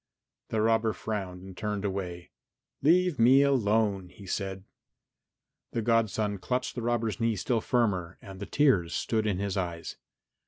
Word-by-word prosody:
The 110 - 0
robber 115 0 +2
frowned 95 -3 -5
and 95 -1 -10
turned 105 0 -3
away. 90 -3 -4 0.5
"Leave 175 0 +3
me 130 +4 +7
alone," 105 -8 +2
he 100 +1 -13
said. 95 0 -3 1.1
The 115 - -1
godson 110 -3 +1
clutched 125 +6 -2
the 120 - -4
robber's 115 -1 -1
knee 115 -1 +1
still 115 +4 0
firmer 95 -9 0
and 95 -2 -11
the 100 - -6
tears 105 - +2
stood 110 -2 0
in 100 -4 0
his 100 0 -2
eyes. 85 -3 -4
105 Hz, 150 wpm, -29 LUFS, 95-115 Hz, 1.1 s, me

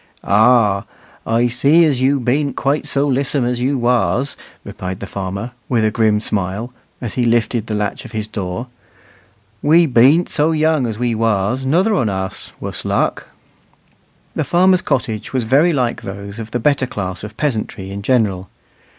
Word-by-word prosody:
"Ah, 105 -2 +3 0.4
I 115 +2 +2
see 140 +8 +4
as 140 -5 +1
you 135 +2 +3
bean't 140 +4 0
quite 140 +2 -1
so 140 +1 0
lissom 135 -1 0
as 120 0 -1
you 135 +3 0
was," 125 +2 +1 0.3
replied 95 0 -6
the - - -5
farmer, 100 +4 -5 0.2
with 115 -3 +2
a 110 - +2
grim 110 -1 +2
smile, 105 +3 -2 0.3
as 120 -4 -4
he 125 - 0
lifted 115 -1 +1
the 110 - -2
latch 105 -1 -2
of 125 - -11
his 110 -2 -3
door; 105 +1 -4 1.0
"we 165 +3 +5
bean't 140 +6 +4
so 160 +1 +1
young 155 -4 +2
as 110 -2 -4
we 120 0 0
was, 110 +3 0
nother 180 +11 +2
on 120 - +1
us, 95 -1 -4
wuss - - -6
luck." - - -1 1.1
The - - -1
farmer's 185 +1 +3
cottage 110 0 -2
was 130 -2 0
very 140 +9 +3
like 125 -6 -1
those 100 +2 -7
of 110 -1 -6
the 120 - -2
better 135 +1 +1
class 95 -5 -5
of 105 +1 -9
peasantry 110 -8 -3
in 100 +1 -5
general. 100 -5 0
120 Hz, 170 wpm, -18 LUFS, 105-140 Hz, 1.1 s, we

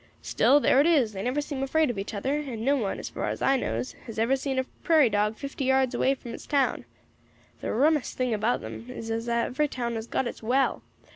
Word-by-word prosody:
Still, 285 - +4
there 275 -1 +4
it 300 - +3
is; 270 -10 +3
they 190 - -5
never 255 +7 0
seem 285 -2 -5
afraid 300 +1 +2
of 210 - -6
each 200 +2 -5
other, 265 +8 -1
and 240 -6 -5
no 280 +2 +4
one, 215 -8 -2
as - - -6
far - - -4
as - - -4
I 270 - +3
knows, 120 - -2 0.2
has 225 - -8
ever 230 +4 +2
seen 270 0 -3
a 260 - +2 0.2
prairie 310 -8 +4
dog 210 +1 +1
fifty 275 -1 -4
yards 265 -1 +2
away 270 +1 +2
from 240 -3 -9
his - - -9
town. 280 -3 +1 0.7
The - - -3
rummest 295 +4 +1
thing 255 -2 0
about 220 +3 0
them 230 - -8
is 225 -2 -6
as 230 +1 -2
every 235 +5 +1
town 240 -4 -3
has 225 0 -4
got 265 - -1
its 240 - -6
well. 260 +4 +1
255 Hz, 235 wpm, -27 LUFS, 225-275 Hz, 0.7 s, Still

